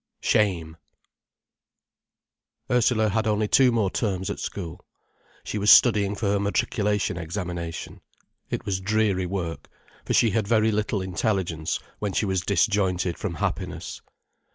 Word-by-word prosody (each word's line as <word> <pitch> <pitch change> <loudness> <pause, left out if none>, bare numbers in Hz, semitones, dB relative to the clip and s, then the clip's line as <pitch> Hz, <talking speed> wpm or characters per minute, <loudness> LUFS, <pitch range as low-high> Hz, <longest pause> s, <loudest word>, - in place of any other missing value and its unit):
SHAME 85 -6 +1 1.9
Ursula 120 -3 +3
had 110 +2 0
only 105 0 +1
two 130 +3 +5
more 110 -5 +1
terms 95 -4 -2
at - - -6
school. 85 -5 -6 0.6
She 105 - -4
was 105 +1 +2
studying 105 -5 +6
for 110 - -4
her 100 - +1
matriculation 100 -1 0
examination. 85 -1 -5 0.5
It - - -4
was 95 -2 -1
dreary 100 -2 +1
work, 85 -3 -4 0.3
for - - -1
she 115 - +4
had 105 0 0
very 110 0 +3
little 105 -2 -1
intelligence 95 -4 -1 0.2
when 100 -2 -2
she 105 - +1
was 95 -2 0
disjointed 95 -3 +1
from 95 -6 -3
happiness. - - -4
100 Hz, 130 wpm, -25 LUFS, 90-110 Hz, 1.9 s, studying